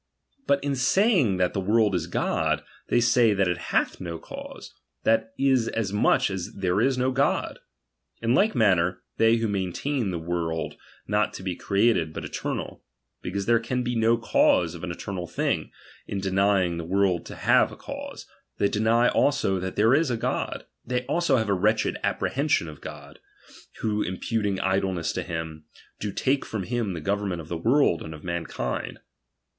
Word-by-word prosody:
But 140 0 +2
in 140 -1 0
saying 140 - +3
that 90 -1 +1
tfcn.' 95 -2 -2
world 110 -1 +3
is 85 -2 -1
God, 85 - 0 0.2
they 120 - +3
say 120 -2 +4
thai 95 - +2
it 90 -2 0
hath - - 0
no 85 -2 -4
cavse, - - -9 0.3
th 115 0 +5
^a 110 - -18
is 130 -4 +3
as 105 -4 -2
much 105 -1 +3
as 95 -2 -5
there 95 +1 0
is 130 +1 +2
no 130 +1 +1
God. 135 +2 0 0.6
In 115 +1 +1
like 210 +10 +3
maun^^^^ii^ 90 -5 +3
,s. - - -25 0.2
they 115 0 +5
who 115 -1 0
maintain 100 +5 -1
the 90 - -2
world 80 -1 -3 0.3
not 105 0 +1
to - - -8
he 90 -2 -2
create 105 +6 +2
^i 80 -2 -2
but - - -6
eternal; - - -5 0.4
because 100 +2 -3
there 115 0 +4
can 125 +2 -2
be 120 0 -2
no 115 +1 +3
cause 90 -6 +3
of 85 - -9
^»e 90 - -4
eternal 90 0 -5
thiug, - - -1 0.4
in 100 - -3
denying 95 -2 +2
the - - -4
world 95 0 +1
to - - -8
hare - - +4
^ - - -12
cause, - - -8 0.3
they 100 - +3
deny 115 +3 +3
also 135 -12 +2
that 95 0 -4
there 110 +4 +4
is 155 +1 +3
a 120 - 0
God. - - -2 0.2
Th^J'' 125 0 -1
also 170 -6 +2
have 110 -2 0
a - - +3
wretched 105 +4 +1
apprehension 140 - 0
of 75 -2 -10
God, - - -10 0.6
wliC 105 -4 -1
imputiug 105 -4 -1
idleness 95 -3 0
to - - -2
him, 80 -2 -5 0.3
do 105 - -3
take 135 +6 0
from 105 -4 -4
him 115 -3 -2
tbe 80 - -6
government 100 -2 -1
of 80 - -13
the 85 - -2
world 115 - +3
and 80 0 -7
of 75 - -13
mankind. 85 -2 -4
100 Hz, 185 wpm, -26 LUFS, 90-120 Hz, 0.6 s, th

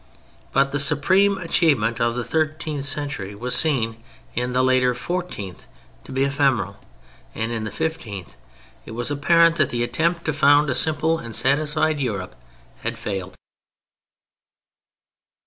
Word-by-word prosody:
But 135 +1 +2
the 145 - -1
supreme 185 +8 +4
achievement 145 - +1
of 120 0 +1
the 125 - -2
thirteenth 155 -1 -2
century 140 -9 -3
was 125 +4 -2
seen 115 -8 +2 0.3
in 125 0 -2
the 130 +1 +1
later 130 -1 +3
fourteenth 175 - -5 0.4
to - - -11
be 130 +1 0
ephemeral, 135 -8 0 0.6
and 115 +1 -3
in 110 -2 -3
the - - -3
fifteenth 105 - -5 0.5
it - - -10
was 120 +4 -1
apparent 165 +3 +4
that - - +2
the 120 0 -1
attempt 170 +6 -1
to 155 - 0
found 145 0 +4
a - - +1
simple 160 +1 +2
and 115 -2 -5
satisfied 150 +2 +2
Europe 100 -8 -3 0.5
had - - -3
failed. 95 -2 -5
140 Hz, 140 wpm, -22 LUFS, 115-155 Hz, 0.6 s, supreme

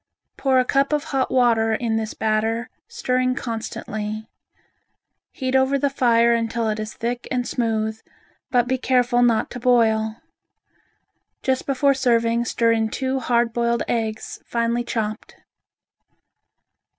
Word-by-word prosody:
Pour 265 -1 +2
a 255 - +3
cup 275 +3 +1
of 295 -1 +1
hot 265 -2 -1
water 230 -3 +3
of - - -1
this 225 -2 -2
batter, 225 +2 -1 0.2
stirring 255 0 0
constantly. 220 -2 -5 1.0
Heat 260 -1 -3
over 265 +1 +3
the 275 0 0
fire 235 -3 +3
until 230 0 -1
it 215 0 -2
is 215 -2 -5
thick 240 +1 -3
and 250 -1 -1
smooth, 220 -2 -1 0.5
but 245 -1 +2
be 260 +1 0
careful 245 -1 +2
not 235 -3 +2
to 245 - -6
boil. 220 -3 +2 1.3
Just 260 -1 0
before 275 0 +3
serving 235 -2 +1
stir 230 0 +2
in 220 -1 +1
two 265 +3 -2
hard 235 -2 +1
boiled 235 0 0
eggs 220 -2 -3
finely 235 0 -1
chopped. 215 -3 -4
235 Hz, 135 wpm, -22 LUFS, 225-255 Hz, 1.3 s, a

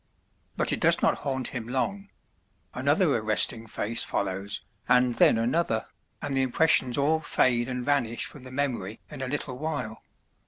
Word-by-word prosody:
But - - +4
it - - -2
does - - +3
not - - +2
haunt 130 -3 -2
him 120 -3 -6
long; 195 +11 -3 0.6
another - - +2
arresting 115 0 +1
face 110 +2 -2
follows, 100 +1 -2 0.3
and 125 0 +4
then - - +5
another, 115 0 0 0.4
and 140 -1 -2
the 135 - +3
impressions 130 -1 +4
all 150 +3 +2
fade 125 -5 +1
and 125 -1 -4
vanish 125 -6 +1
from 145 - -7
the 130 0 -11
memory 125 -7 -3
in 145 -3 -7
a 130 - -2
little 130 -2 -4
while. 145 -8 -4
125 Hz, 160 wpm, -26 LUFS, 115-145 Hz, 0.6 s, then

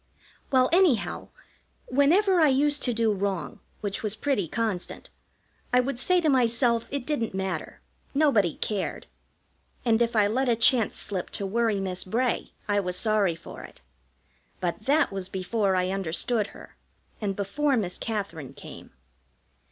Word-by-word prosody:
Well, 255 -1 +4
anyhow, 340 - +2 0.6
whenever 345 +8 +3
I 310 - +6
used 290 +2 +2
to 250 - +1
do 225 -1 +2
wrong, 195 -4 -3 0.2
which 205 -1 -3
was 215 -1 -1
pretty 220 -7 0
constant, 215 -1 -3 0.6
I 250 - +5
would 250 0 -1
say 365 +6 +3
to 320 - +1
myself 235 -3 +2
it 280 -3 -4
didn't 235 -10 -2
matter, 190 -4 -4 0.3
nobody 230 - +3
cared. 205 -3 -3 0.8
And 230 -1 +3
if 235 0 +1
I 210 -2 +5
let 250 +5 +1
a 235 - +4
chance 230 0 +3
slip 190 -3 -4
to 200 - -3
worry 220 0 +1
Miss 185 -1 -2
Bray 235 +6 -1 0.2
I 205 -1 +2
was 180 -2 -2
sorry 210 -6 +2
for 165 - -10
it; - - -12 0.8
but 180 +3 -3
that 295 -1 +3
was 195 -1 -5
before 190 +1 0
I 185 0 +1
understood 195 +4 -1
her, - - -14 0.4
and 200 -2 -1
before 265 +8 0
Miss 185 -5 -2
Katherine 200 - -4
came. - - -11
220 Hz, 150 wpm, -26 LUFS, 195-260 Hz, 0.8 s, I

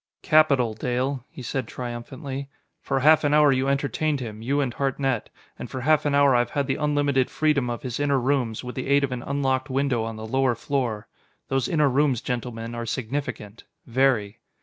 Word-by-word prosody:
"Capital, 145 -8 +4
Dale," 125 +3 -2
he 130 - -10
said 130 -1 -3
triumphantly. 130 +3 -6 0.3
"For 135 - -1
half 155 +3 +6
an 145 0 +3
hour 150 -1 +6
you 130 0 +1
entertained 140 +2 0
him, 110 -4 -7
you 140 +5 0
and 135 -4 0
Hartnett. 135 -3 -1 0.3
And - - -6
for 130 - -5
half 150 +2 +3
an 145 - +1
hour 140 -2 +5
I've 120 0 +2
had 140 -1 -1
the 135 - 0
unlimited 145 -3 +1
freedom 150 -5 +1
of 120 - -4
his 125 -2 -4
inner 140 -2 +2
rooms, 125 -4 0
with 125 0 -6
the 130 - -4
aid 140 +1 +3
of 135 - -1
an 125 -1 -3
unlocked 135 0 -1
window 130 -3 0
on 115 0 -4
the 110 0 -7
lower 130 +1 +1
floor. 130 -8 -2 0.4
Those 135 -2 0
inner 150 -3 +3
rooms, 135 -2 +2
gentlemen, 120 -2 -4
are 115 0 -5
significant 115 -3 -4 0.2
very!" 120 -4 +1
130 Hz, 195 wpm, -24 LUFS, 120-140 Hz, 0.4 s, half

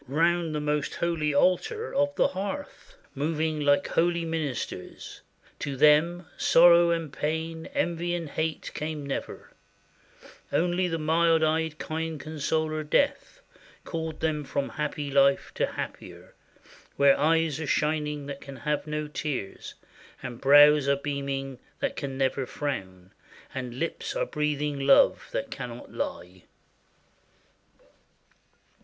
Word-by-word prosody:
Round 165 +3 +1
the - - 0
most 150 -1 -1
holy 165 -3 0
altar 305 - +1
of 285 +1 +1
the - - +3
hearth 285 - -6 0.2
Moving 155 +2 -1
like 145 +4 +3
holy 170 0 +1
ministers. 160 -5 -5 0.4
To 140 -2 -4
them 165 +5 +4
Sorrow 170 0 +6
and 165 -4 -1
pain, 160 +1 -3
envy 175 - -1
and 170 -2 -4
hate, 160 +2 -3
came 150 -1 -4
never; 140 - -5 1.0
Only 180 +2 +1
the 165 -2 -2
mild 165 +1 +3
eyed 160 0 0
kind 160 0 -4
consoler, 155 +1 -2
Death, 285 - 0 0.4
Called 160 -2 -5
them 155 -2 0
from 140 0 -2
happy 150 -1 -3
life 140 0 +3
to - - 0
happier, - - -8 0.6
Where 140 -1 +5
eyes 160 0 +2
are 155 - -4
shining 150 -1 0
that 140 -1 -7
can 140 -1 -9
have 150 +4 -2
no 150 0 -3
tears, 145 -9 -5 0.5
And 120 -2 -7
brows 145 +1 +7
are 140 - +4
beaming 140 -2 -4 0.2
that - - -1
can 135 -1 -5
never 135 -1 0
frown. 95 -10 -5 0.4
And 125 -2 -5
lips 165 +5 -3
are - - 0
breathing 150 -1 -2
love 135 0 +4
that - - -3
cannot 120 -1 -7
lie. 90 +1 -5
150 Hz, 125 wpm, -27 LUFS, 140-165 Hz, 1.0 s, brows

